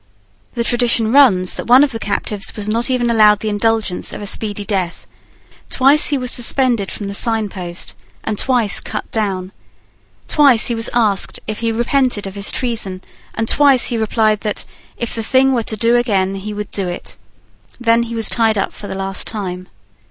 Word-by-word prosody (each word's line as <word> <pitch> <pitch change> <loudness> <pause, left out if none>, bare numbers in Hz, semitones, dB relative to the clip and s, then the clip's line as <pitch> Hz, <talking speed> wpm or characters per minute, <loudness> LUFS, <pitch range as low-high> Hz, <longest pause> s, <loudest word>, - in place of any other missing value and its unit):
The 235 - 0
tradition 235 -2 +1
runs 220 -10 +4
that - - -6
one 250 +4 +7
of 290 - 0
the 225 - -4
captives 205 0 -2
was 210 -1 -4
not 230 +4 -1
even 245 -2 +1
allowed 210 -2 +5
the 220 - -2
indulgence 210 -2 -1
of - - -6
a 205 - -6
speedy 205 0 -3
death. 185 -5 -3 0.6
Twice 275 +3 +4
he 290 - +1
was 250 -1 -2
suspended 245 -4 +2
from 205 - -5
the 200 - -5
signpost, 200 -6 -2 0.3
and 215 - -2
twice 240 -2 +1
cut 215 - -6
down. 195 -4 -2 0.8
Twice 275 -7 +4
he - - 0
was 225 0 -1
asked 210 -5 +1
if 215 - -4
he 230 0 0
repented 240 -1 0
of 195 - -6
his 200 0 -1
treason, 220 -7 -3 0.3
and 225 0 -2
twice 275 -2 +4
he 240 - -1
replied 215 -1 +1
that, 210 -2 -3 0.3
if 235 - -3
the 225 - -3
thing 260 +4 +2
were 240 - +1
to 220 -1 -3
do 230 +3 +2
again, 200 -6 +1
he 195 +2 -6
would 210 0 -6
do 195 -2 -1
it. 175 - -6 0.6
Then 230 -1 +3
he 235 0 -4
was 225 -1 +1
tied 225 -2 +1
up 195 - -2
for 205 - -9
the - - -5
last 195 0 -2
time. 185 -4 -5
220 Hz, 190 wpm, -17 LUFS, 200-240 Hz, 0.8 s, one